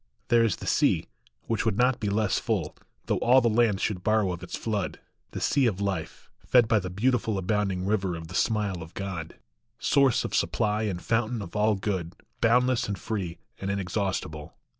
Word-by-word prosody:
There 120 Hz, -1 st, +5 dB
is 110 Hz, -7 st, +2 dB
the -, -, -9 dB
sea, -, -, +2 dB, 0.4 s
which 115 Hz, -3 st, -1 dB
would 110 Hz, -3 st, 0 dB
not 125 Hz, +1 st, +3 dB
be 105 Hz, -, -1 dB
less 105 Hz, 0 st, +1 dB
full, 105 Hz, -10 st, -2 dB, 0.3 s
Though -, -, 0 dB
all 125 Hz, +2 st, +5 dB
the 120 Hz, -, +2 dB
lands 110 Hz, -3 st, +2 dB
should 90 Hz, -4 st, -1 dB
borrow 110 Hz, -3 st, +2 dB
of 90 Hz, -1 st, -5 dB
its 90 Hz, -, -5 dB
flood; 105 Hz, -4 st, -2 dB, 0.3 s
The -, -, -6 dB
sea 135 Hz, -3 st, +2 dB
of 100 Hz, -4 st, -1 dB
Life, 95 Hz, -5 st, -4 dB
fed 120 Hz, -3 st, +4 dB
by 110 Hz, -1 st, +3 dB
the 90 Hz, -2 st, -5 dB
beautiful 110 Hz, +2 st, 0 dB
Abounding 95 Hz, -1 st, 0 dB
river 95 Hz, -3 st, 0 dB
of 80 Hz, -1 st, -7 dB
the 90 Hz, -, -10 dB
smile 105 Hz, -4 st, 0 dB
of 80 Hz, +1 st, -11 dB
God, 95 Hz, -5 st, -5 dB, 0.4 s
Source 135 Hz, 0 st, +3 dB
of -, -, -5 dB
supply 105 Hz, 0 st, +1 dB
and 95 Hz, -4 st, -2 dB
fountain 115 Hz, +3 st, 0 dB
of 85 Hz, -, -10 dB
all 105 Hz, 0 st, +3 dB
good, 95 Hz, -3 st, -3 dB, 0.3 s
Boundless 125 Hz, +1 st, +3 dB
and 100 Hz, -1 st, -3 dB
free 95 Hz, -7 st, -4 dB, 0.2 s
and 100 Hz, -, -3 dB
inexhaustible. 95 Hz, -6 st, -3 dB
105 Hz, 190 wpm, -27 LUFS, 95-115 Hz, 0.4 s, There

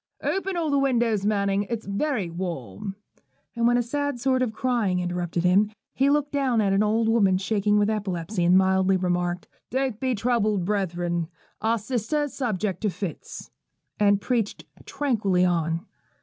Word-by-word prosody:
'Open 385 Hz, -1 st, -1 dB
all 320 Hz, -3 st, 0 dB
the 280 Hz, -, +3 dB
windows, 235 Hz, -6 st, +1 dB
Manning: 200 Hz, -1 st, +1 dB
it's 230 Hz, -2 st, -3 dB
very 205 Hz, -, -1 dB
warm.' 170 Hz, -, -5 dB, 0.6 s
And 235 Hz, 0 st, +2 dB
when 240 Hz, 0 st, +4 dB
a 245 Hz, -, +1 dB
sad 285 Hz, +1 st, -2 dB
sort 260 Hz, +1 st, +1 dB
of 250 Hz, -3 st, +1 dB
cry 240 Hz, -2 st, 0 dB
interrupted 175 Hz, -1 st, -1 dB
him, 195 Hz, +4 st, +4 dB, 0.2 s
he 270 Hz, +1 st, +2 dB
looked 290 Hz, 0 st, +1 dB
down 270 Hz, -5 st, +1 dB
at 200 Hz, -2 st, +2 dB
an 195 Hz, -, +3 dB
old 220 Hz, +2 st, +2 dB
woman 205 Hz, -5 st, +3 dB
shaking 205 Hz, +1 st, +1 dB
with 205 Hz, 0 st, +3 dB
epilepsy, 195 Hz, -3 st, -2 dB
and 175 Hz, +2 st, +5 dB
mildly 190 Hz, 0 st, +3 dB
remarked, 175 Hz, -1 st, -1 dB, 0.2 s
'Don't 260 Hz, -4 st, -1 dB
be 260 Hz, -2 st, 0 dB
troubled, 215 Hz, -4 st, +1 dB
brethren: 175 Hz, -4 st, -1 dB, 0.3 s
our 225 Hz, +2 st, +2 dB
sister 245 Hz, +6 st, -1 dB
is 290 Hz, -, -5 dB
subject 210 Hz, -7 st, -2 dB
to 215 Hz, -, +1 dB
fits,' 190 Hz, -2 st, -7 dB, 0.5 s
and 205 Hz, -1 st, +4 dB
preached 230 Hz, -4 st, -1 dB, 0.2 s
tranquilly 205 Hz, -10 st, +1 dB
on. 165 Hz, 0 st, 0 dB
210 Hz, 165 wpm, -25 LUFS, 185-245 Hz, 0.6 s, and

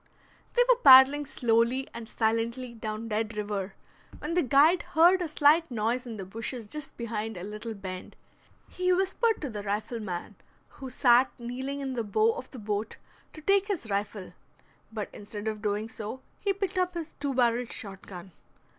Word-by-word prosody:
They -, -, +6 dB
were -, -, +5 dB
paddling 270 Hz, -, +8 dB
slowly 240 Hz, 0 st, +1 dB
and 230 Hz, -1 st, -8 dB
silently 230 Hz, +2 st, -1 dB
down 220 Hz, 0 st, -5 dB
Dead 220 Hz, 0 st, -2 dB
River, 205 Hz, -2 st, -3 dB, 0.4 s
when 305 Hz, +3 st, -4 dB
the 355 Hz, -, +3 dB
guide 295 Hz, +6 st, +5 dB
heard 350 Hz, +3 st, +4 dB
a 350 Hz, -, -1 dB
slight 310 Hz, +2 st, +4 dB
noise 240 Hz, +2 st, -1 dB
in 225 Hz, -2 st, -6 dB
the 195 Hz, -, -6 dB
bushes 225 Hz, +4 st, -4 dB
just 290 Hz, +6 st, -7 dB
behind 225 Hz, -3 st, -4 dB
a 175 Hz, -, -6 dB
little 215 Hz, +3 st, -6 dB
bend. 185 Hz, -2 st, -7 dB, 0.5 s
He 365 Hz, 0 st, 0 dB
whispered 385 Hz, +5 st, +1 dB
to 285 Hz, -, -3 dB
the 210 Hz, -1 st, -5 dB
rifleman, 205 Hz, -2 st, -4 dB, 0.3 s
who 265 Hz, -2 st, -9 dB
sat 250 Hz, 0 st, +4 dB
kneeling 260 Hz, +4 st, -4 dB
in 265 Hz, -1 st, -3 dB
the 235 Hz, -2 st, -2 dB
bow 430 Hz, -, +2 dB
of 485 Hz, -, -8 dB
the 260 Hz, -, -11 dB
boat, 210 Hz, -1 st, -3 dB, 0.4 s
to 310 Hz, -, -11 dB
take 395 Hz, +4 st, +3 dB
his 335 Hz, -, -3 dB
rifle. 200 Hz, -1 st, -3 dB, 0.6 s
But 215 Hz, -2 st, -4 dB
instead 205 Hz, +1 st, -7 dB
of 215 Hz, -1 st, -3 dB
doing 210 Hz, 0 st, -1 dB
so 230 Hz, +1 st, -7 dB, 0.2 s
he 400 Hz, -, 0 dB
picked 390 Hz, -1 st, -2 dB
up 365 Hz, -1 st, 0 dB
his 330 Hz, -2 st, -5 dB
two 280 Hz, -2 st, -2 dB
barreled 240 Hz, -1 st, +2 dB
shot 195 Hz, -2 st, -7 dB
gun. 185 Hz, 0 st, -9 dB
235 Hz, 175 wpm, -28 LUFS, 215-295 Hz, 0.6 s, paddling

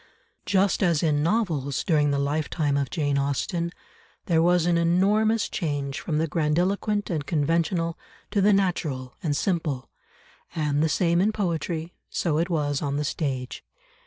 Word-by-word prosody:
Just 195 Hz, 0 st, +2 dB
as 170 Hz, -5 st, +2 dB
in 150 Hz, -2 st, +2 dB
novels 160 Hz, -, 0 dB
during 150 Hz, -3 st, +2 dB
the 140 Hz, -, +1 dB
lifetime 145 Hz, +1 st, 0 dB
of 140 Hz, -2 st, 0 dB
Jane 145 Hz, -3 st, 0 dB
Austen, 170 Hz, +5 st, -1 dB, 0.5 s
there 165 Hz, -2 st, +3 dB
was 175 Hz, 0 st, +3 dB
an 175 Hz, -1 st, +2 dB
enormous 200 Hz, +6 st, +2 dB
change 145 Hz, -5 st, -3 dB
from 155 Hz, -3 st, -2 dB
the 160 Hz, -, +2 dB
grandiloquent 180 Hz, +7 st, 0 dB
and 155 Hz, -4 st, -1 dB
conventional, 165 Hz, +3 st, 0 dB, 0.3 s
to 200 Hz, -, +2 dB
the 205 Hz, +2 st, +5 dB
natural 155 Hz, -10 st, 0 dB
and 145 Hz, -4 st, 0 dB
simple, 160 Hz, -9 st, -2 dB, 0.6 s
and 150 Hz, -2 st, 0 dB
the 160 Hz, -, +2 dB
same 170 Hz, +2 st, +2 dB
in 210 Hz, +3 st, +3 dB
poetry, 170 Hz, -4 st, -2 dB, 0.2 s
so 160 Hz, -3 st, 0 dB
it 170 Hz, +3 st, 0 dB
was 145 Hz, -4 st, 0 dB
on 140 Hz, -1 st, -1 dB
the 150 Hz, -, -1 dB
stage. 135 Hz, -5 st, -3 dB
160 Hz, 155 wpm, -25 LUFS, 145-180 Hz, 0.6 s, the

